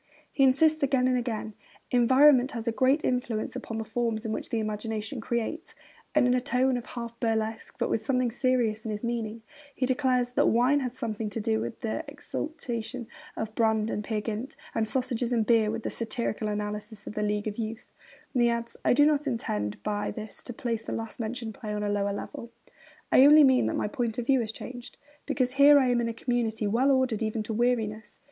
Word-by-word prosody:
He 275 Hz, -, +2 dB
insists, 310 Hz, +4 st, +4 dB
again 265 Hz, -2 st, +2 dB
and 255 Hz, -, +2 dB
again: 230 Hz, -3 st, -3 dB, 0.4 s
'Environment 260 Hz, +2 st, +5 dB
has 230 Hz, -1 st, -5 dB
a -, -, +3 dB
great 265 Hz, +6 st, +2 dB
influence 245 Hz, -3 st, -1 dB
upon 235 Hz, -3 st, -5 dB
the 220 Hz, -, -2 dB
forms 230 Hz, 0 st, -2 dB
in 220 Hz, -, -2 dB
which -, -, -4 dB
the 230 Hz, -, -1 dB
imagination 220 Hz, +3 st, -3 dB
creates'; 235 Hz, +8 st, -3 dB, 0.4 s
and, 300 Hz, -4 st, +5 dB
in 250 Hz, -, +3 dB
a 250 Hz, -, +2 dB
tone 255 Hz, +1 st, +2 dB
of 245 Hz, -1 st, -5 dB
half 235 Hz, -1 st, -7 dB
burlesque, 225 Hz, -1 st, -2 dB
but -, -, 0 dB
with 220 Hz, -, -1 dB
something 255 Hz, 0 st, +1 dB
serious 240 Hz, -3 st, +1 dB
in 225 Hz, -, -5 dB
his 210 Hz, +1 st, -4 dB
meaning, 230 Hz, -1 st, -3 dB, 0.3 s
he 255 Hz, -, 0 dB
declares 255 Hz, -2 st, +1 dB
that -, -, +2 dB
wine 250 Hz, +5 st, +3 dB
had 250 Hz, -2 st, -4 dB
something 225 Hz, -4 st, -3 dB
to 210 Hz, -, -4 dB
do 220 Hz, 0 st, 0 dB
with -, -, -6 dB
the 225 Hz, +8 st, -2 dB
exaltation 255 Hz, -5 st, -5 dB, 0.3 s
of 220 Hz, -1 st, -4 dB
Brand 220 Hz, -1 st, +1 dB
and 210 Hz, -, -2 dB
Peer 215 Hz, -1 st, -2 dB
Gynt, 225 Hz, +5 st, -4 dB, 0.2 s
and 220 Hz, -1 st, 0 dB
sausages 245 Hz, 0 st, -1 dB
and 230 Hz, -3 st, +2 dB
beer 225 Hz, -2 st, +4 dB
with 225 Hz, +1 st, -3 dB
the -, -, -3 dB
satirical 220 Hz, -1 st, -2 dB
analysis 210 Hz, 0 st, -4 dB
of -, -, -6 dB
The 215 Hz, -, -2 dB
League 210 Hz, 0 st, -1 dB
of 210 Hz, +1 st, -4 dB
Youth. 225 Hz, +1 st, -5 dB, 0.4 s
And 250 Hz, -, +2 dB
he 240 Hz, -, +5 dB
adds: 235 Hz, 0 st, -3 dB
'I -, -, +4 dB
do 290 Hz, +3 st, +5 dB
not 300 Hz, -1 st, +2 dB
intend 105 Hz, -, -2 dB
by 205 Hz, -1 st, -1 dB
this 215 Hz, -2 st, -7 dB
to -, -, -5 dB
place 230 Hz, -1 st, -2 dB
the -, -, -5 dB
last 225 Hz, +1 st, -5 dB
mentioned 225 Hz, 0 st, -4 dB
play 210 Hz, 0 st, -6 dB
on 210 Hz, 0 st, -2 dB
a 205 Hz, -, -1 dB
lower 200 Hz, 0 st, 0 dB
level. 215 Hz, +3 st, -6 dB, 0.6 s
I 260 Hz, -, +7 dB
only 300 Hz, +2 st, +9 dB
mean 260 Hz, -2 st, +4 dB
that -, -, -1 dB
my -, -, 0 dB
point 225 Hz, +1 st, -2 dB
of 245 Hz, -, -2 dB
view 265 Hz, +1 st, +4 dB
has 220 Hz, -2 st, -3 dB
changed, 245 Hz, +2 st, -9 dB, 0.3 s
because 255 Hz, -2 st, 0 dB
here 280 Hz, +2 st, +7 dB
I 260 Hz, -3 st, +3 dB
am 240 Hz, -1 st, +2 dB
in 230 Hz, -, -1 dB
a -, -, -3 dB
community 230 Hz, -2 st, -1 dB
well 235 Hz, +7 st, +2 dB
ordered 260 Hz, -5 st, +2 dB
even 215 Hz, 0 st, -1 dB
to 220 Hz, -, -4 dB
weariness.' 220 Hz, -2 st, -1 dB
235 Hz, 215 wpm, -28 LUFS, 220-255 Hz, 0.6 s, only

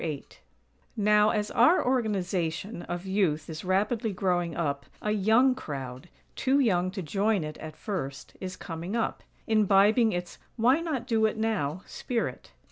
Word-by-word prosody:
VIII 150 Hz, -4 st, -4 dB, 0.7 s
Now, 210 Hz, 0 st, +4 dB
as 210 Hz, -1 st, -1 dB
our 255 Hz, +10 st, +4 dB
Organization 195 Hz, -6 st, -1 dB
of 175 Hz, +1 st, -5 dB
Youth 185 Hz, -6 st, 0 dB
is 155 Hz, -, -6 dB
rapidly 210 Hz, +5 st, 0 dB
growing 180 Hz, -3 st, 0 dB
up, 140 Hz, -4 st, -2 dB
a 210 Hz, -, -1 dB
young 220 Hz, +6 st, +4 dB
crowd, 135 Hz, -, -7 dB, 0.3 s
too 270 Hz, +2 st, +2 dB
young 185 Hz, -8 st, +2 dB
to 190 Hz, 0 st, -5 dB
join 200 Hz, +3 st, +1 dB
it 155 Hz, 0 st, -7 dB
at 155 Hz, -1 st, -8 dB
first, 140 Hz, -, -5 dB
is 185 Hz, -1 st, -5 dB
coming 170 Hz, +3 st, -5 dB
up; 230 Hz, -, -1 dB, 0.2 s
imbibing 215 Hz, +1 st, +4 dB
its 175 Hz, -1 st, -5 dB, 0.2 s
"why 250 Hz, +6 st, +4 dB
not 305 Hz, -8 st, -3 dB
do 225 Hz, -3 st, +3 dB
it 215 Hz, -, -4 dB
now?" 195 Hz, -7 st, -1 dB
spirit. 240 Hz, -2 st, -4 dB
200 Hz, 150 wpm, -28 LUFS, 170-225 Hz, 0.7 s, Now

